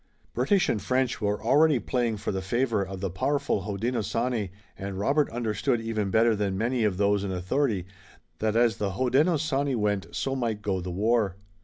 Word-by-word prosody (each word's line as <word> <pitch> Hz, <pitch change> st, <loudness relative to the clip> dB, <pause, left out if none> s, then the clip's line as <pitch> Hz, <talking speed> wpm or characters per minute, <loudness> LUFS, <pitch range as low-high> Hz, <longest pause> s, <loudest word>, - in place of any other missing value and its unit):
British 175 Hz, -, +2 dB
and 105 Hz, -, 0 dB
French 130 Hz, +4 st, 0 dB
were 105 Hz, 0 st, -1 dB
already 145 Hz, +5 st, +4 dB
playing 120 Hz, -2 st, -1 dB
for -, -, -3 dB
the 95 Hz, -1 st, -2 dB
favor 115 Hz, +2 st, 0 dB
of 95 Hz, 0 st, -7 dB
the 95 Hz, -, -1 dB
powerful 140 Hz, +4 st, 0 dB
Hodenosaunee, 115 Hz, +1 st, -1 dB, 0.3 s
and 95 Hz, 0 st, -6 dB
Robert 140 Hz, +9 st, +2 dB
understood 115 Hz, 0 st, -1 dB
even 110 Hz, -3 st, -2 dB
better 110 Hz, +2 st, +4 dB
than 100 Hz, -2 st, -1 dB
many 120 Hz, +3 st, 0 dB
of 100 Hz, -4 st, +1 dB
those 100 Hz, 0 st, +2 dB
in 100 Hz, -, -3 dB
authority 95 Hz, +2 st, 0 dB, 0.5 s
that 110 Hz, 0 st, 0 dB
as 115 Hz, -1 st, +3 dB
the 100 Hz, -2 st, -2 dB
Hodenosaunee 140 Hz, -, +1 dB
went 105 Hz, -5 st, 0 dB
so 135 Hz, 0 st, -2 dB
might 115 Hz, -5 st, -2 dB
go 95 Hz, -3 st, -1 dB
the 90 Hz, -, -5 dB
war. 105 Hz, +1 st, +1 dB
110 Hz, 175 wpm, -27 LUFS, 100-125 Hz, 0.5 s, already